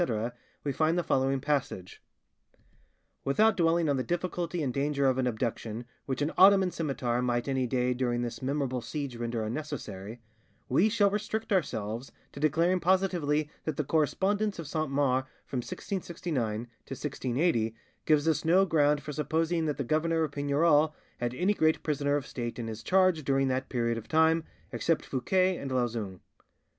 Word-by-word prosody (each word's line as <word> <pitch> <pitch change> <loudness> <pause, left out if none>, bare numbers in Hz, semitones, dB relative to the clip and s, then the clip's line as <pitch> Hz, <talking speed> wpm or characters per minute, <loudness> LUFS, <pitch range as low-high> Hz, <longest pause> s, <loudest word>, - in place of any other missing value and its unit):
', - - -35
we 145 - -1
find 160 +5 +1
the 175 - +1
following 135 -1 +1
passage:— 135 -10 -2 1.2
"Without 215 +11 +3
dwelling 165 -1 +2
on 140 -2 +2
the 130 - 0
difficulty 175 +2 -2
and 130 -3 -1
danger 140 +1 0
of 130 -1 +3
an 130 - +1
abduction, 115 -1 -3 0.2
which 135 +1 -1
an 150 - 0
Ottoman 190 -1 +7
scimitar 130 -7 -1
might 120 0 0
any 130 -2 0
day 125 0 +1
during 120 -1 -1
this 120 -1 -5
memorable 130 -2 -1
siege 135 +2 -4
render 115 -1 -2
unnecessary, 110 -5 -5 0.5
we 170 +12 +3
shall 205 -2 +3
restrict 215 +1 -2
ourselves 120 - -2 0.2
to - - -9
declaring 165 +5 +2
positively 175 -5 +1 0.2
that 155 -3 -3
the 150 - +1
correspondence 195 +8 +1
of 165 - -5
Saint 155 -1 -2
Mars 135 -2 +1 0.2
from 130 - -5
1669 135 - -3 0.2
to - - -5
1680 130 -4 0 0.3
gives 155 0 +3
us 160 - +2
no 180 +4 +5
ground 150 -4 +2
for 150 - -5
supposing 160 +3 0
that 150 - -1
the 140 - -1
governor 160 +4 +1
of 155 - -2
Pignerol 145 +2 +3 0.3
had 120 0 -2
any 185 +8 +2
great 160 -5 +2
prisoner 145 -1 0
of 145 -2 -2
state 120 -4 -5
in 120 - -4
his 110 -1 -6
charge 185 -4 +3
during 135 0 +2
that 130 +1 -1
period 115 -2 0
of 115 - -13
time, 160 0 +3 0.3
except 165 -2 0
Fouquet 185 +8 +1
and 140 - -5
Lauzun. 115 -7 -2
145 Hz, 170 wpm, -29 LUFS, 125-165 Hz, 1.2 s, Ottoman